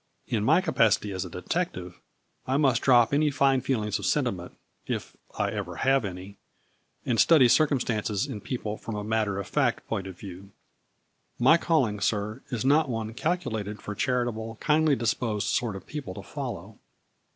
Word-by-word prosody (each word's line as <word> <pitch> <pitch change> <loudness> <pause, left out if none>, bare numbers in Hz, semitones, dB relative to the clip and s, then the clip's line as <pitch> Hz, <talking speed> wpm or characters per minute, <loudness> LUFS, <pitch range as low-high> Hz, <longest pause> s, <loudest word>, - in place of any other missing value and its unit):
In 110 -3 -1
my 160 +10 +4
capacity 110 - +2
as 95 -1 -3
a - - -7
detec 170 - -2
tive 90 -1 -9 0.5
I 130 +1 +1
must 135 -5 +3
drop 120 -2 +5
any 150 +1 +3
fine 135 -2 +2
feelings 110 -6 -1
of - - -2
sentiment - - -1 0.3
(if - - -4 0.2
I - - 0
ever - - -4
have 135 -1 +2
any) 95 +1 -8 0.7
and 120 -3 0
study 155 -7 +6
circumstances 120 -6 +1
and 120 -8 -7
people 110 -4 -4
from 110 - -6
a 105 - -4
matter 105 -2 0
of 100 - -5
fact - - 0
point 95 - -3
of 95 -2 -9
view. 95 0 -10 0.8
My 130 +7 +6
calling, 135 -12 +1
sir, 105 +4 -1
is 125 -2 -3
not 145 +1 +4
one 115 -2 -3
calculated 110 - -2
for 105 - -6
chari 125 +1 +1
table, 110 -1 -5
kindly 155 -1 +3
disposed 110 -3 -1
sort 115 -2 0
of 95 - -9
people 140 -12 -6
to - - -8
follow." - - -7
115 Hz, 175 wpm, -27 LUFS, 105-135 Hz, 0.8 s, study